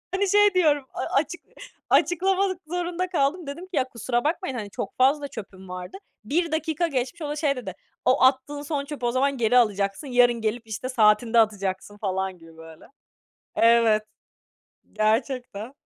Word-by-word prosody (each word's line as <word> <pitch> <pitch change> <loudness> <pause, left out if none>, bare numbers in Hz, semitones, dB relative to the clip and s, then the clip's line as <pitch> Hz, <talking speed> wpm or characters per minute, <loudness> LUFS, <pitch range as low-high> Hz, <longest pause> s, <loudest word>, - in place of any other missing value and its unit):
Hani, 395 0 +1
şey 415 0 +5
diyorum, 295 -6 +3
a - - -4
açık 295 +5 -1 0.5
açıklamak 375 +1 +2
zorunda 355 +1 -2
kaldım. 315 0 0
Dedim 285 +6 -6
ki 370 - -8
"Ya, 255 - +4
kusura 240 +1 -2
bakmayın, 310 -3 -2
hani, 210 -3 -5
çok 195 - -6
fazla 280 +3 +3
çöpüm 190 -6 -10
vardı." 180 - -7 0.3
1 330 +8 0
dakika 315 +1 0
geçmiş, 275 +4 -3
o 295 - -3
da 295 - -3
şey 295 -2 0
dedi, 205 -8 -6 0.3
"O 260 +2 +3
attığın 270 +2 +2
son 285 -1 -3
çöpü 285 -4 -6
o 240 - +2
zaman 270 +2 +1
geri 240 +1 +3
alacaksın, 205 +3 +1
yarın 245 -2 +3
gelip 225 +1 -2
işte, 225 +4 -5
saatinde 225 -1 +4
atacaksın," 205 -1 -1
falan 190 -2 -2
gibi 165 -1 -17
böyle 160 -1 -13 0.7
Evet, 230 -2 +4 0.9
gerçekten. 230 +1 -1
255 Hz, 165 wpm, -25 LUFS, 215-305 Hz, 0.9 s, şey